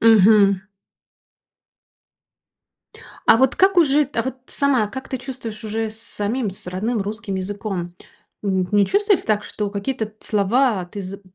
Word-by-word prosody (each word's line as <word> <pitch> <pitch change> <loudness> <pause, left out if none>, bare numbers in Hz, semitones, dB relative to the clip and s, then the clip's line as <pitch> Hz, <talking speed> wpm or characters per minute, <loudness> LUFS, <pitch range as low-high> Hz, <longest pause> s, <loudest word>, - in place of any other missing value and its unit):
Мгм. 205 -3 +6 2.6
А 225 - +7
вот 265 0 +3
как 385 0 +3
уже 295 -3 +5
т 270 -3 -4
а - - +1
вот 260 0 -4
сама, 265 -7 +1
как 265 +4 -7
ты 260 - -2
чувствуешь 245 -4 -7
уже 220 +1 -2
с 220 +1 -12
самим, 220 +1 -2
с 190 - -11
родным 210 +5 -1
русским 210 0 -4
языком? 190 -2 -4 0.5
Н 190 -2 0
не 205 -1 +4
чувствуете 405 - +2
так, 210 -1 0
что 210 -1 -4
какие-то 210 +3 -3
т 215 - -21
слова 210 0 +2
ты 200 +3 -7
за 195 +1 -8
215 Hz, 155 wpm, -21 LUFS, 200-255 Hz, 2.6 s, А